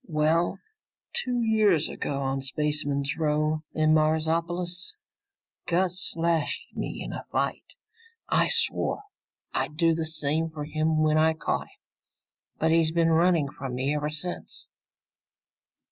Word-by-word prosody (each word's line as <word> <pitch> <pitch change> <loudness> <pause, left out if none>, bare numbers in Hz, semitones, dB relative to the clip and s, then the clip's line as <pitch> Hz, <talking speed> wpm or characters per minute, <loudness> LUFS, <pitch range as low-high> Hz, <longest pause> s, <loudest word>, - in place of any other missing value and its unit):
"Well, 160 +2 +2 0.6
two 245 -2 -1
years 210 -8 +3
ago, 140 -1 -3
on 135 0 -1
Spaceman's 145 0 -1
Row 155 0 +1
in 155 0 +4
Marsopolis, 165 - 0 0.7
Gus 180 +1 +1
slashed 165 -2 -1
me - - -4
in - - -6
a - - -6
fight. - - -2 0.5
I - - +3
swore 460 -3 0 0.5
I'd 150 - -2
do 165 0 +4
the 165 0 -1
same 155 +1 0
for 150 -2 -6
him 155 +1 +1
when 155 0 +3
I 160 +1 +4
caught - - -2
him, - - -24 0.8
but 160 +1 +2
he's 165 -1 +4
been 165 0 +3
running 165 -3 +3
from 135 -2 -6
me 135 +3 0
ever 150 0 -1
since." 155 +4 -5
160 Hz, 130 wpm, -27 LUFS, 150-170 Hz, 0.8 s, in